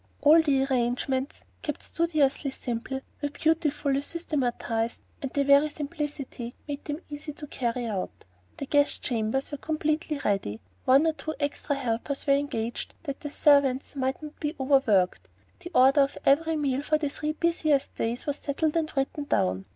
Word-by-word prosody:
All 310 +3 +7
the 275 -4 +2
arrangements, 260 +1 -1 0.2
kept 295 -3 -4
studiously 305 -4 +1
simple, 265 +1 -4 0.2
were 290 - 0
beautifully 295 -2 +1
systematized; 245 -7 -2 0.2
and 270 - -3
their 280 - +1
very 280 +2 +5
simplicity 290 -5 -5
made 285 -1 -5
them 295 +2 -4
easy 295 +1 -5
to 295 - -8
carry 245 -3 -2
out. 200 -5 -4 0.3
The 280 - -4
guest 285 +1 +2
chambers 240 +3 -1
were 290 - -5
completely 310 0 -1
ready, 110 - 0 0.3
one 275 +4 +6
or 320 - +3
two 315 0 -5
extra 285 0 -1
helpers 265 +1 -2
were 280 - +4
engaged 240 -5 -2
that 280 -4 -5
the 290 - -5
servants 280 -2 +3
might 265 +2 -1
not 300 0 -9
be 300 +2 -2
overworked, 215 - +3 0.3
the 350 -1 -8
order 270 +3 +6
of 275 0 +1
every 320 +4 +4
meal 280 -3 0
for 305 +1 +2
the 300 -2 -1
three 300 +2 -3
busiest 310 -4 +1
days 235 +2 -2
was 290 -1 -1
settled 300 +2 -1
and 320 -2 0
written 285 +2 -1
down. 95 - +1
280 Hz, 165 wpm, -27 LUFS, 260-300 Hz, 0.3 s, All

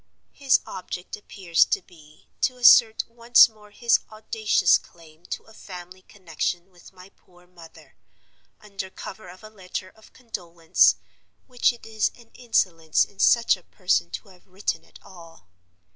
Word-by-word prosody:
His 275 -2 +2
object 180 -1 -7
appears 190 -5 +1
to - - -1
be 155 -4 -21
to 255 -1 0
assert 235 -2 +6
once 235 +1 +5
more 215 -2 -19
his 235 +3 +2
audacious 215 -3 +2
claim 165 0 -20
to - - -5
a 220 - -19
family 180 -2 -11
connection 175 -1 -5
with 175 -1 -18
my 185 0 -16
poor 180 -2 -25
mother, 170 -2 -17 0.6
under 195 -2 -8
cover 190 +1 -10
of 185 +4 -14
a 215 - -11
letter 185 -2 -7
of 220 - -21
condolence; 175 -9 +1 0.5
which 250 -1 +1
it 240 - -15
is 220 -1 0
an 235 -2 -20
insolence 170 -10 +1
in 200 - -23
such 235 -3 +4
a 185 - -18
person 95 - -1
to 105 - -8
have 180 -2 -21
written 190 +2 -4
at - - -17
all. 165 - -15
190 Hz, 155 wpm, -24 LUFS, 175-220 Hz, 0.6 s, assert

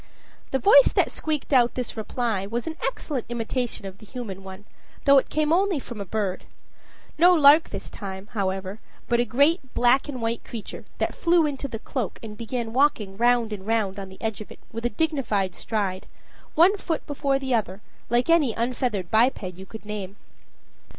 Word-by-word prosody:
The 270 - +1
voice 270 +2 +7
that - - +2
squeaked 305 -2 -2
out 245 -2 +4
this 250 -2 -3
reply 220 -3 -2
was 235 +3 -3
an 320 - -4
excellent 270 -1 -3
imitation 240 -1 -3
of 190 0 -8
the - - -13
human 205 -7 -7
one, 190 +1 -10 0.4
though 280 -1 +8
it - - -6
came 310 +1 +1
only 380 -1 +2
from 235 -5 -8
a - - -4
bird. 195 -1 -2 0.7
No 355 +2 +7
lark 305 +1 +7
this - - -6
time, 190 -1 -7
however, 195 -1 -2 0.3
but 235 -1 +2
a 240 - +3
great 280 +3 +2
black 255 +4 +3
and 260 -3 -5
white 230 0 -2
creature 225 -4 -8
that - - -1
flew 340 -1 +3
into 280 -1 -3
the 230 - -5
cloak, 235 -1 -4
and 215 -1 -7
began 230 0 -4
walking 235 -8 +2
round 235 0 +2
and 195 -1 -8
round 210 -3 0
on 195 -1 -7
the 190 - -14
edge 220 -2 -3
of 215 - -9
it - - -11
with 230 +1 -2
a - - -3
dignified 235 - 0
stride, 195 -4 -3 0.5
one 360 +6 +5
foot 330 -5 -3
before 280 -1 0
the 265 -1 -2
other, 200 -4 -1 0.3
like 240 +1 +2
any 315 -9 +3
unfeathered 235 -6 -2
biped 230 +1 +3
you 185 +1 -7
could 220 +1 -10
name. 205 -2 -5
235 Hz, 190 wpm, -25 LUFS, 205-275 Hz, 0.7 s, though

